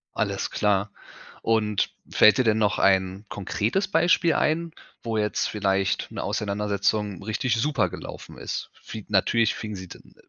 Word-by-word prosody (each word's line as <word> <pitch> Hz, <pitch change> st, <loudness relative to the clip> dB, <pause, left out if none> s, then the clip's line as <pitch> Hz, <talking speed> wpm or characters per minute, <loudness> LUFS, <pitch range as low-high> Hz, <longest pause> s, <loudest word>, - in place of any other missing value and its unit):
Alles -, -, -1 dB
klar. 100 Hz, 0 st, +1 dB, 0.5 s
Und 105 Hz, -2 st, +1 dB, 0.2 s
fällt 110 Hz, +2 st, +6 dB
dir 130 Hz, -, +3 dB
denn 110 Hz, -1 st, +3 dB
noch 105 Hz, -2 st, +2 dB
ein 95 Hz, +1 st, +2 dB
konkretes 105 Hz, -, -1 dB
Beispiel 170 Hz, -1 st, +3 dB
ein, 165 Hz, +2 st, +1 dB, 0.3 s
wo 115 Hz, -2 st, -2 dB
jetzt 105 Hz, -1 st, 0 dB
vielleicht 95 Hz, -2 st, 0 dB
'ne -, -, -5 dB
Auseinandersetzung 105 Hz, -1 st, -1 dB
richtig 115 Hz, +3 st, 0 dB
super 145 Hz, +5 st, +1 dB
gelaufen -, -, -9 dB
ist? -, -, -5 dB
Fi 110 Hz, -2 st, -9 dB
natürlich 110 Hz, +3 st, +2 dB
fing 105 Hz, -2 st, -6 dB
sie 95 Hz, -1 st, -8 dB
dann -, -, -14 dB
105 Hz, 145 wpm, -25 LUFS, 100-115 Hz, 0.5 s, fällt